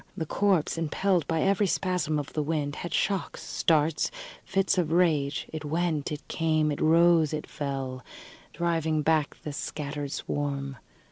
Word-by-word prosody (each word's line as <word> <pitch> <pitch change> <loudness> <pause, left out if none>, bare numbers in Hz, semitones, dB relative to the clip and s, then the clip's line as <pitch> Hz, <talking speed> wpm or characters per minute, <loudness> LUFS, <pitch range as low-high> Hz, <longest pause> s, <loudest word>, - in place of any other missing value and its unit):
The 160 - -2
corpse, 185 -2 +1
impelled 170 +1 +1
by 160 -1 +1
every 200 +1 +3
spasm 180 -5 0
of 145 0 -4
the 155 - 0
wind, 150 -1 -2
had 175 - -5
shocks, 195 -2 -1
starts, 155 -1 +2 0.3
fits 195 -1 +1
of 165 -3 0
rage: 155 -5 +2
it 155 -1 -4
went, 155 -1 -1
it 150 0 -6
came, 155 -2 +1
it 145 - -3
rose, 165 -1 +5
it 150 - -5
fell, 135 -3 -4 0.5
driving 160 -3 0
back 155 -1 +1
the 150 - -5
scattered 145 -1 -4
swarm. 140 -2 -3
155 Hz, 150 wpm, -28 LUFS, 145-170 Hz, 0.5 s, rose